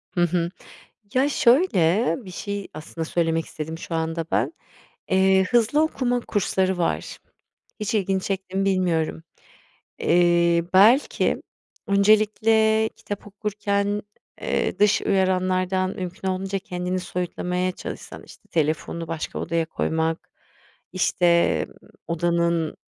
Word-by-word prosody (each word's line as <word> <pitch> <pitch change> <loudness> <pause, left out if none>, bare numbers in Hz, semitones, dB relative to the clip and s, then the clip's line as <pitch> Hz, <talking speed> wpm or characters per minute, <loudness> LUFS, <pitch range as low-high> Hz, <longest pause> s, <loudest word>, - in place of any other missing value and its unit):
Hı 175 - +2
hı. 170 0 +1 0.6
Ya 265 +3 +3
şöyle 235 - +3
bir 185 - -9
şey 200 +1 -5
aslında 160 +1 -6
söylemek 165 -1 0
istedim 160 +1 -6
şu 165 0 -5
anda 160 0 -2
ben. - - +1 0.6
Eee, 190 0 +4
hızlı 240 +6 +3
okuma 245 -6 0
kursları 190 -3 0
var. 170 - -2 0.6
Hiç 210 +1 -2
ilgini 195 -2 +1
çekti 190 -1 -3
mi 195 - +1
bilmiyorum. 170 -4 0 0.8
Eee, 170 -1 +3
belki 225 +9 +4 0.5
öncelikle 215 +2 +3
kitap 205 0 -7
okurken, 205 0 -1 0.4
eee, - - -1
dış 210 0 +4
uyaranlardan 185 -1 +1
mümkün 185 +1 -5
olduğunca 190 +1 -2
kendini 180 -2 -3
soyutlamaya 180 0 -2
çalışsan. - - -8
İşte, - - -17
telefonunu 160 +1 -1
başka 165 -1 -4
odaya 165 -1 -1
koymak, 160 0 -2 0.6
işte, 175 -2 +3
ııı, - - -18 0.3
odanın 170 -1 0
185 Hz, 115 wpm, -24 LUFS, 170-205 Hz, 0.8 s, Eee